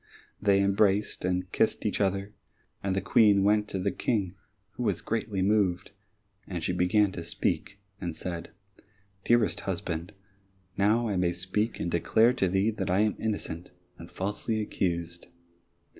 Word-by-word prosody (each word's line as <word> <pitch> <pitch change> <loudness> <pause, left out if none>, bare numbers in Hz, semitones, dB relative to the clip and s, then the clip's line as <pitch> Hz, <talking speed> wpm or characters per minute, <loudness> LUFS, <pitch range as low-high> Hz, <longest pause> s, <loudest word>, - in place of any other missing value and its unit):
They 100 -1 +4
embraced 100 +1 +2
and 90 0 -1
kissed - - +1
each - - 0
other, 100 +1 0 0.5
and 95 -1 -1
the 95 - 0
Queen 100 0 +4
went 105 +1 +3
to 95 - -4
the 95 +1 0
King, 100 -7 -1 0.4
who - - -8
was - - 0
greatly 105 -4 -2
moved, 100 -3 +1 0.6
and 85 -3 -4
she 90 - 0
began 95 +3 +3
to 90 - -6
speak 100 +4 -2 0.2
and 85 -3 -4
said, 85 -1 -5 0.8
"Dearest 120 -2 +3
husband, 85 0 -4 0.6
now 110 +4 +2
I 100 -3 -1
may 90 -1 +2
speak 105 +5 -2
and 85 - -2
declare 110 +7 +3
to 100 -7 +1
thee 95 +4 +2
that 100 -3 -4
I 95 +3 +3
am 105 -1 +2
innocent, 100 -6 -3 0.3
and 85 - -10
falsely 105 +3 -2
accused." 85 -5 -2
95 Hz, 155 wpm, -28 LUFS, 90-105 Hz, 0.8 s, They